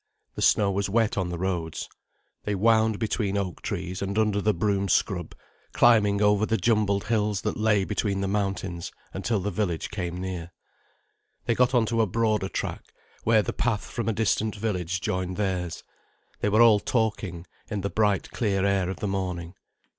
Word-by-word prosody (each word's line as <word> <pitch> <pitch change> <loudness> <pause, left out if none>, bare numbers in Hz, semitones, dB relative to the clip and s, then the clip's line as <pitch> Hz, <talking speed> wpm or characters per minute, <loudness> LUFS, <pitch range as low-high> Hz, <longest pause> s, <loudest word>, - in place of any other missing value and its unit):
The - - -6
snow 100 -2 +4
was 100 +1 -1
wet 110 +1 +2
on 95 -3 -1
the 90 - -4
roads. 85 -3 -3 0.6
They 105 - -1
wound 110 +1 +3
between 105 -2 -1
oak 95 -3 -3
trees 90 +2 -4
and 100 +1 -2
under 105 -2 +2
the 105 - +3
broom 100 -2 0
scrub, - - 0 0.4
climbing 105 -4 +4
over 105 0 +4
the 115 +1 +1
jumbled 105 -4 +2
hills 105 -3 0
that - - -2
lay 105 -2 +2
between 100 -1 -1
the 100 - -1
mountains, 95 -3 -2 0.2
until 105 +3 -1
the 100 +2 -2
village 90 -4 -2
came 90 -4 -4
near. 90 -2 -5 0.9
They - - +2
got 125 +2 +2
on 120 -2 +4
to 115 +1 +1
a 110 - +2
broader 110 -1 0
track, - - -4 0.4
where 110 -1 +4
the - - -3
path 115 -4 -1
from 115 -1 -3
a - - +1
distant 110 0 0
village 90 -4 -2
joined 90 0 -2
theirs. 90 -4 -2 0.6
They 105 - +1
were 110 +3 +5
all 110 -3 +6
talking, 100 -7 -1 0.2
in 105 -2 -2
the 100 - -3
bright 105 -3 +1
clear 100 -4 0
air 100 -2 +1
of 95 - -6
the 105 - -1
morning. 90 -3 -3
100 Hz, 180 wpm, -26 LUFS, 95-110 Hz, 0.9 s, all